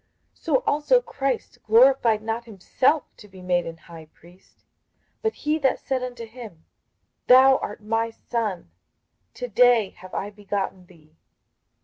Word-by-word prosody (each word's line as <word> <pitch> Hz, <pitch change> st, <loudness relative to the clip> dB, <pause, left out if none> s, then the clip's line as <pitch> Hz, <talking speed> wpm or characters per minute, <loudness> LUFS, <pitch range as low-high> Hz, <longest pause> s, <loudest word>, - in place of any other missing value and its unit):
58:005:005 -, -, -32 dB
So -, -, +1 dB
also 305 Hz, +8 st, +3 dB
Christ 275 Hz, -, -4 dB
glorified 230 Hz, -1 st, +4 dB
not 225 Hz, +1 st, -3 dB
himself 250 Hz, -, 0 dB
to 210 Hz, -, -14 dB
be 190 Hz, -2 st, -14 dB
made 175 Hz, -1 st, 0 dB
an 165 Hz, 0 st, -7 dB
high 165 Hz, -1 st, -13 dB
priest; 175 Hz, +4 st, -22 dB, 0.6 s
but 445 Hz, -1 st, -1 dB
he 305 Hz, +1 st, -1 dB
that 270 Hz, -3 st, +1 dB
said 265 Hz, -1 st, -3 dB
unto 245 Hz, -2 st, -6 dB
him, 220 Hz, -8 st, -12 dB, 0.6 s
Thou 265 Hz, +1 st, +7 dB
art 210 Hz, +1 st, -7 dB
my 225 Hz, +1 st, -1 dB
Son, 220 Hz, -, -4 dB, 0.6 s
to 245 Hz, -, -5 dB
day 235 Hz, -2 st, +4 dB
have 185 Hz, 0 st, -13 dB
I 205 Hz, +2 st, -4 dB
begotten 200 Hz, -3 st, -5 dB
thee. 160 Hz, -3 st, -22 dB
225 Hz, 145 wpm, -24 LUFS, 185-255 Hz, 0.6 s, Thou